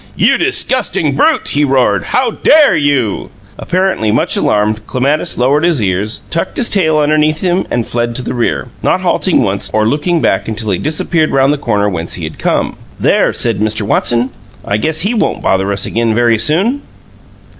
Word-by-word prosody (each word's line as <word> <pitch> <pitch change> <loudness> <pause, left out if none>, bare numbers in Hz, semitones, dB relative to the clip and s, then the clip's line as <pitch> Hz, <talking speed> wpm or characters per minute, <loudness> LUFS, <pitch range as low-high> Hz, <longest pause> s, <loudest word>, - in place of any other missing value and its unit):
"You - - +2
disgusting - - 0
brute!" - - +2
he 145 - +1
roared. 130 - +1
"How 255 -3 0
DARE 295 - +4
you?" 145 -8 -1 0.3
Apparently 185 - -1
much - - 0
alarmed, 105 +1 0
Clematis 140 +4 0
lowered 140 +5 +1
his 170 -5 +2
ears, 100 +1 -1
tucked 165 +2 -2
his 240 - 0
tail 160 -6 +2
underneath 155 +1 +1
him, 185 0 0
and 120 -2 -1
fled 120 0 -2
to 130 - +1
the - - -4
rear, 120 -2 -2
not - - 0
halting - - +1
once - - -2
or 110 0 +1
looking 155 +7 0
back 95 -9 0
until 110 -1 -3
he 90 - -1
disappeared 155 +1 0
round 135 +1 +2
the 150 - -4
corner 105 -6 0
whence 85 -4 -3
he 85 - -7
had 80 0 -7
come. - - -1 0.2
"There!" - - +2
said - - 0
Mr. 110 0 0
Watson. 120 +4 +1 0.3
"I 100 - -1
guess 155 +8 0
HE 205 +6 0
won't 225 - -1
bother 95 +1 0
us 100 0 0
again 115 -1 -1
very 115 -2 +2
soon!" 200 - +2
130 Hz, 185 wpm, -13 LUFS, 110-155 Hz, 0.3 s, DARE